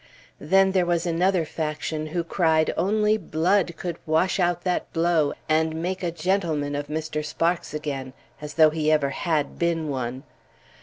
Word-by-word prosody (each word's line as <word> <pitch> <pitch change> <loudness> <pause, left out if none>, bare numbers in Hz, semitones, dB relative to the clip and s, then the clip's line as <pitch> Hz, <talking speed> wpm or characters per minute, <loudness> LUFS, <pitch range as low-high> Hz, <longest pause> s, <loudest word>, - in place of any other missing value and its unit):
Then 190 +5 +3
there 185 -1 +2
was 170 0 +1
another 175 +1 +1
faction 155 0 -3
who 170 +2 -2
cried 160 -2 +2
only 210 +4 +2
blood 175 0 +1
could 170 -1 -5
wash 160 +5 +2
out 175 -1 +1
that 180 -1 -1
blow 165 -3 +2
and 160 0 +1
make 185 +3 -3
a 175 - -1
gentleman 165 -4 -1
of 145 0 -3
Mr. 155 0 -3
Sparks 170 +3 -1
again, 140 -4 -4 0.3
as 150 0 -7
though 155 -1 +6
he 155 -1 0
ever 145 -3 +2
had 155 0 -1
been 165 -2 0
one! 130 -1 -3
160 Hz, 160 wpm, -24 LUFS, 150-175 Hz, 0.3 s, though